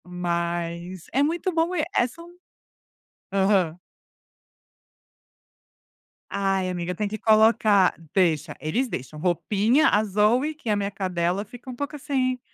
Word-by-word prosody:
Mas 170 0 -3
é 270 - +3
muito 340 +5 0
bom 330 +2 +1
e, 310 - +1
eh, 240 - +3
são 335 +7 -13 1.0
Aham. 190 -4 +2 2.5
Ai 195 -1 0
amiga, 180 0 -3
tem 210 +3 -1
que 215 +2 -4
colocar 215 -3 +4 0.2
deixa, 170 -6 +1
eles 225 +13 -1
deixam. 145 - -6
Roupinha, 205 - +2
a 210 - +3
Zoey, 215 +9 +2
que 300 -7 -7
é - - +3
a - - +3
minha 200 0 -2
cadela, 185 -1 -1
fica 245 +4 -12
um 250 - -6
pouco 285 +3 -4
assim: 265 -3 -1
205 Hz, 135 wpm, -24 LUFS, 180-255 Hz, 2.5 s, colocar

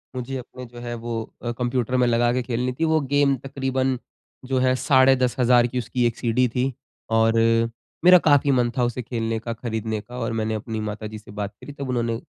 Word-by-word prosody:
मुझे 130 +1 -4
अपने 125 0 -9
जो 120 0 -12
है 120 0 -5
वो 120 0 -5 0.3
अ, 120 - -2
कंप्यूटर 125 0 -1
में 125 -1 +3
लगा 120 0 +3
के 125 - 0
खेलनी 125 +1 -2
थी 165 - +2
वो 160 0 +3
गेम 145 -1 +4
तकरीबन 135 -1 -1 0.5
जो 130 0 0
है 130 0 +3
साढ़े 130 +1 +5
10,000 125 -1 +3
की 125 - -5
उसकी 120 +1 -1
1 120 -1 0
सीडी 125 +1 +2
थी 130 +1 0 0.4
और 115 0 +3 0.7
मेरा 180 0 +10
काफ़ी 145 -3 +4
मन 125 -2 +2
था 125 - +2
उसे 120 +1 -1
खेलने 115 -2 -2
का, 115 +1 -4
खरीदने 110 -2 -3
का 120 +4 -11
और 115 -1 -2
मैंने 110 0 -1
अपनी 110 +1 -4
माताजी 105 0 -5
से 105 - -14
बात 105 0 -5
करी 145 - -9
तब 140 -2 -6
उन्होंने, 120 -2 0
120 Hz, 210 wpm, -23 LUFS, 115-130 Hz, 0.7 s, मेरा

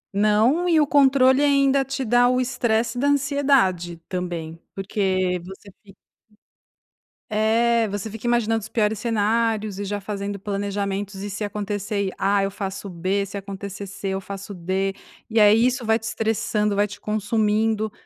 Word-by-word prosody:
Não 220 - +3
e 325 -2 +4
o 300 - +4
controle 270 -1 +4
ainda 275 -1 +3
te 270 0 -4
dá 245 +2 +4
o 255 - +2
estresse 240 -2 0
da 280 - +1
ansiedade 275 - +2
também, 170 -3 -5
porque 190 -2 0
você 190 +2 -11
é - - -15
você - - -38
fic 195 -2 -17 1.3
É, 225 +2 +2
você 205 +2 -4
fica 225 +2 -6
imaginando 225 -2 +1
os 220 - -9
piores 215 -2 0
cenários 220 -2 0
e 205 - -3
já 205 +1 -3
fazendo 200 0 -4
planejamentos 200 0 -3
e 205 - -4
se 210 +2 -4
acontecer 205 -1 -2
A 200 0 +2
eu 195 - -1
faço 195 0 -5
B 185 +3 -1
se 200 +1 -7
acontecer 200 0 -7
C 195 0 -5
eu 190 0 -2
faço 200 +1 -7
D 190 +2 -2 0.4
e 225 - +2
aí 215 +2 +6
isso 250 -1 0
vai 220 0 +3
te 225 - -15
estressando, 215 -2 -1
vai 205 +1 +2
te 205 0 -10
consumindo, 215 0 0
210 Hz, 165 wpm, -23 LUFS, 195-235 Hz, 1.3 s, aí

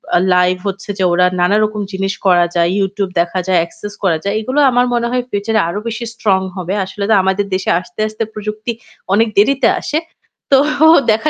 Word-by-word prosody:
আ - - +6 0.2
live 180 0 +2
হচ্ছে 195 +1 -5
যে - - +1
ওরা 180 +1 +3
নানারকম 210 +3 +1
জিনিস 195 +1 -2
করা 175 -2 +4
যায়, 170 0 +2
YouTube 195 0 -2
দেখা 175 +2 -2
যায়, 180 -2 +3
access 205 +3 -10
করা 170 -4 +2
যায়। 200 - -1
এই - - -6
গুলো 275 +3 0
আমার 245 +1 +3
মনে 235 0 0
হয় 250 0 0
future 210 +2 -1
এ - - +4
আরও 205 - -3
বেশি 230 +1 -4
strong 195 -5 +1
হবে। 185 0 -4
আসলে 200 +1 -6
তো - - +5
আমাদের 190 +1 0
দেশে 185 - -2
আস্তে, 235 +4 -15
আস্তে 215 +1 -4
প্রযুক্তি 215 +2 -4 0.4
অনেক 225 +3 +3
দেরিতে 270 +7 +4
আসে। 300 - -2 0.5
তো 270 - +7 0.5
দেখা 225 +8 +1
205 Hz, 200 wpm, -16 LUFS, 185-220 Hz, 0.5 s, তো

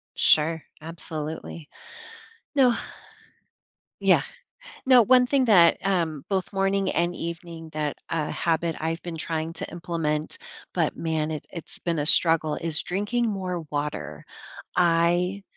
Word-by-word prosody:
Sure, 160 +1 +4 0.2
absolutely. 160 -1 -5 0.9
No 255 -4 +5 1.3
Yeah, - - +5 0.7
no, 255 -2 +8
one 250 +2 +5
thing 270 0 +2
that, 175 -7 +6
um, 165 -7 0
both 190 -1 -1
morning 195 0 +1
and 175 +1 +1
evening 170 -1 -7
that 150 -1 -2
a 160 -2 -1
habit 165 -1 0
I've 165 +2 -3
been 170 -2 -6
trying 160 0 -3
to - - -5
implement- 160 -3 -2 0.4
but, - - 0
man, 160 -1 -1
it 155 - -5
it's 170 -3 -9
been 170 -2 -1
a 145 - -1
struggle- 160 -2 +3
is 165 -2 0
drinking 210 +6 -1
more 185 -4 -3
water, 150 0 -4 0.5
I 175 +3 +2
170 Hz, 125 wpm, -25 LUFS, 160-190 Hz, 1.3 s, no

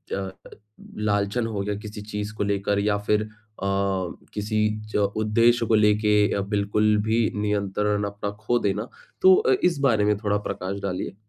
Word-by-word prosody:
अ, 95 -1 -4 0.7
लांछन 105 +2 0
हो 105 -3 -3
गया 105 +1 -2
किसी 105 0 -8
चीज़ 105 0 -5
को 105 - -1
लेकर 100 0 0
या 105 0 +1
फिर 105 0 +3
अ, - - -8 1.1
किसी 105 +1 0 0.2
ज - - -8 0.2
उद्देश्य 115 +2 +3
को 110 - +3
लेके 105 0 +3 0.2
अ, 100 - 0
बिल्कुल 105 +1 +1
भी 110 +1 +2 0.2
नियंत्रण 105 0 0
अपना 100 0 -4
खो 120 +3 +1
देना? 105 +3 -1 0.3
तो 375 0 +8
अ, 435 +2 +2
इस 170 -5 +2
बारे 115 -7 +3
में 105 -1 +2
थोड़ा 105 -1 0
प्रकाश 100 +2 -4
डालिए। 95 0 -4
105 Hz, 165 wpm, -24 LUFS, 100-110 Hz, 1.1 s, तो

